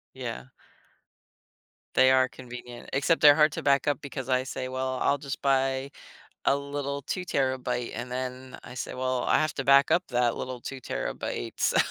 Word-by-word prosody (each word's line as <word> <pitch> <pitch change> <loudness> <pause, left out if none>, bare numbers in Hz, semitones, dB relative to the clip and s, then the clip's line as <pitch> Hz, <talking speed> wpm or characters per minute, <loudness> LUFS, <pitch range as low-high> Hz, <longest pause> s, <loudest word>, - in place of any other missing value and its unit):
Yeah. 60 +1 -5 1.5
They 130 - +6
are 130 -1 +4
convenient, 125 -1 -10
except 140 +5 +2
they're 145 -1 +8
hard 150 -1 +5
to - - -4
back 140 -1 +3
up 145 -2 +1
because 135 -2 -6
I 130 -1 +2
say, 130 0 -5
"Well, 130 0 -2
I'll 140 - +2
just 140 -1 -6
buy 135 0 +1 0.6
a 140 - +5
little 140 0 -4
two-terabyte," 130 -7 -1
and 120 +2 -5
then 130 0 -5
I 125 - -10
say, 130 - -5
"Well, 130 0 -1
I - - +3
have 155 -1 +1
to 135 - -2
back 140 +1 +6
up 180 +1 +3
that 120 -2 +1
little 130 -1 -5
two-terabyte, 130 - -5
so - - +2
130 Hz, 170 wpm, -27 LUFS, 125-140 Hz, 1.5 s, they're